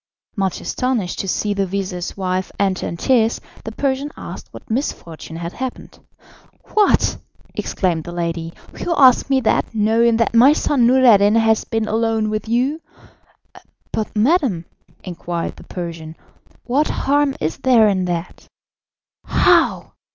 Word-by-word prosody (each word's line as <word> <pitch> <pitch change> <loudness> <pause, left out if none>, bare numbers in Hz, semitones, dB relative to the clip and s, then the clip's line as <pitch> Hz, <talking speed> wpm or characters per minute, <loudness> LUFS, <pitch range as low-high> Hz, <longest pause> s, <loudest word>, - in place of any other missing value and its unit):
Much 195 -3 -1
astonished 245 -8 -2
to 195 - -3
see 205 +2 -1
the 200 -1 -1
vizir's 185 -2 -4
wife 185 -1 -2
enter 190 -2 0
in 170 - -5
tears, 230 +1 +2 0.3
the 225 - -5
Persian 275 +4 -1
asked - - -8
what - - -12
misfortune 170 - -4
had 170 +1 -6
happened. 260 -1 -7 0.7
"What!" 425 -2 +3 0.4
exclaimed 170 -5 -2
the 175 - -7
lady, 170 -1 -3 0.3
"you 340 - -1
ask 260 -1 +5
me 265 -1 +2
that, 225 - 0
knowing 225 +2 +3
that 230 0 +1
my 250 +5 +7
son 270 -5 +2
Noureddin 230 -5 +5
has 225 -1 +2
been 225 -1 -2
alone 220 0 0
with 215 +1 -4
you?" 260 +7 0 1.1
"But, 215 - -3
madam," 225 - +1 0.4
inquired 175 -1 -5
the - - -13
Persian, 165 -3 -7 0.5
"what 275 +5 +1
harm 285 0 +1
is 155 - -2
there 240 -4 +4
in 190 -3 +1
that?" 175 -1 -5 0.8
"How! - - +2
220 Hz, 140 wpm, -19 LUFS, 180-255 Hz, 1.1 s, my